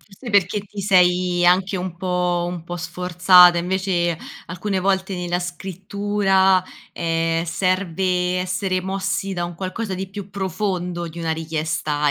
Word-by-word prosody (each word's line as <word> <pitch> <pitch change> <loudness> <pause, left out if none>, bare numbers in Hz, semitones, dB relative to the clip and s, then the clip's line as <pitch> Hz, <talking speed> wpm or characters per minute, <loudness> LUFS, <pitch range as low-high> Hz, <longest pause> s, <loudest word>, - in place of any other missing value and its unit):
Forse 215 +4 -11
perché 200 +1 +2
ti 205 0 -9
sei 180 -2 +3
anche 185 +2 +3
un 180 -1 -5
po' 180 -1 0
un 175 -2 -5
po' 175 +1 -5
sforzata, 180 +1 +5
invece 175 -2 0 0.3
alcune 190 +3 -3
volte 190 0 0
nella 175 0 -2
scrittura, 190 +2 +1 0.3
ehm, 165 0 0
serve 180 0 0
essere 185 0 -1
mossi 190 +1 -2
da 175 - -2
un 175 0 -6
qualcosa 190 +3 -4
di 190 +1 -5
più 195 0 -8
profondo 180 -3 -3
di 170 +1 -10
una 165 -1 -1
richiesta 155 -2 -1
180 Hz, 140 wpm, -21 LUFS, 175-190 Hz, 0.3 s, sforzata